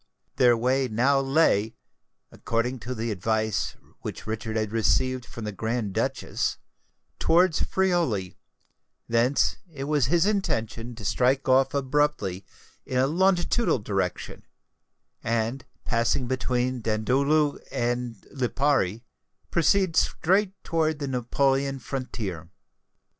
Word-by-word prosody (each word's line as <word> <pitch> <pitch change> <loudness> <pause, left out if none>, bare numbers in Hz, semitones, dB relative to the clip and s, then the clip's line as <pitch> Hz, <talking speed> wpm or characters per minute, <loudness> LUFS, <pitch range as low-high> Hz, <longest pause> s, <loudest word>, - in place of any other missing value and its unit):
Their 120 -3 +5
way 130 +3 +1
now 130 +5 +2
lay, 135 -6 +2 0.6
according 120 +3 -2
to 125 +2 -5
the 115 0 -2
advice 110 +2 -1 0.2
which - - -7
Richard 110 0 -3
had 110 -1 -1
received 125 +3 +1
from 115 - -8
the 105 - -3
Grand 110 0 -2
Duchess, - - -1 0.6
towards 170 0 +3
Friuli: 170 - 0 0.7
thence 120 +4 +2
it 140 -3 -6
was 145 -3 +1
his 170 +5 +3
intention 120 - -1
to 110 -3 -9
strike 130 +6 +1
off 130 +1 +3
abruptly 140 -9 0 0.4
in 130 - -3
a 130 - +4
longitudinal 180 - +2
direction, 95 -4 -3 0.8
and, 115 +3 -1 0.2
passing 115 +2 +1
between 125 0 -1
Dandolo 140 +7 +1
and 120 0 -1 0.2
Lipari, 130 -5 0 0.5
proceed 175 +1 +2
straight 190 +4 +2
toward 160 -2 0
the 145 -1 -4
Neapolitan 135 +2 +1
frontier. 110 - -5
125 Hz, 110 wpm, -26 LUFS, 115-145 Hz, 0.8 s, Their